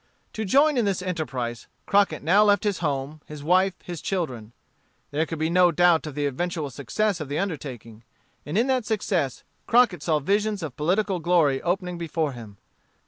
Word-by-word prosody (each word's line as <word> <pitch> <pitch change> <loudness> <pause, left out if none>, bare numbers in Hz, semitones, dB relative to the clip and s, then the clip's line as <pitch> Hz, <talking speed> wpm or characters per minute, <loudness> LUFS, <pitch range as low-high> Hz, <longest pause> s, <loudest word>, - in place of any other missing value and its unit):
To 220 - -3
join 280 +7 +4
in 235 - +2
this 190 -2 -1
enterprise, 130 -10 -4 0.2
Crockett 200 -8 +2
now 190 +7 +5
left 205 0 +3
his 205 -3 0
home, 145 -1 -3
his 150 -1 -9
wife, 185 +4 +3
his 175 -3 -7
children. 130 - -3 0.6
There 155 +3 0
could 165 - -5
be 160 +1 0
no 180 0 +5
doubt 170 -1 +3
of 150 - -7
the 145 -1 -1
eventual 150 +1 -2
success 185 - -1
of 150 -3 -6
the 145 - -2
undertaking. 130 - -5 0.4
And 150 +6 -3
in 235 - +3
that 260 -2 +1
success 185 - -1 0.2
Crockett 235 -6 +4
saw 160 -2 +1
visions 205 +5 0
of 145 -6 -5
political 185 +4 0
glory 160 -6 +2
opening 180 0 -2
before 160 -2 -1
him. 110 -5 -11
170 Hz, 180 wpm, -25 LUFS, 145-195 Hz, 0.6 s, now